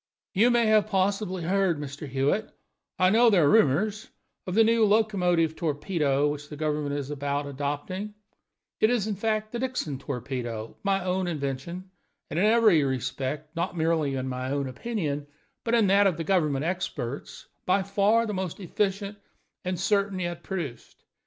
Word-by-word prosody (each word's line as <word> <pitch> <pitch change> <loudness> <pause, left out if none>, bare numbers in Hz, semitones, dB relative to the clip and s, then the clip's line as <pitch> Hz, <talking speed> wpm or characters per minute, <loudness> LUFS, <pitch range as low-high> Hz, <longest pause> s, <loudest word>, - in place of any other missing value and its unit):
"You 220 +6 +4
may 225 -3 +4
possibly 195 -2 -1
have 170 - -2
heard, 195 -5 +2
Mr. 145 +1 -6
Hewitt 140 +11 0 0.5
I 185 0 +4
know 235 +3 +6
there 180 -8 +4
are - - +4
rumors 210 +3 +2 0.4
of 180 - -2
the 225 - +6
new 225 0 +3
locomotive 185 -7 +2
torpedo 150 -3 0
which 145 0 -4
the 150 - -7
government 150 -2 -1
is 145 0 -4
about 145 0 -2
adopting; 145 +9 -4 0.6
it 215 - +4
is, 240 -5 +1
in 215 - -1
fact, 215 +1 -1
the 240 - -3
Dixon 250 - -2
torpedo, 125 -4 -5
my 195 -2 0
own 185 0 0
invention, 165 +4 -4 0.4
and 155 - -1
in 195 - +4
every 215 -8 +5
respect 135 +4 -3
not 170 +1 -2
merely 160 -4 +1
in 130 0 -3
my 130 0 -3
own 140 0 -1
opinion, 145 - -3 0.4
but 235 0 +1
in 225 -3 +4
that 200 +1 +5
of 180 -5 0
the 165 - -2
government 155 -5 +1
experts 145 -7 -4 0.2
by 190 +1 +3
far 205 +4 +2
the 210 - -3
most 185 -2 -4
efficient 200 +2 -2 0.4
and 180 -1 -2
certain 200 0 +1
yet 175 -1 -3
produced. 160 - -6
175 Hz, 165 wpm, -27 LUFS, 145-205 Hz, 0.6 s, know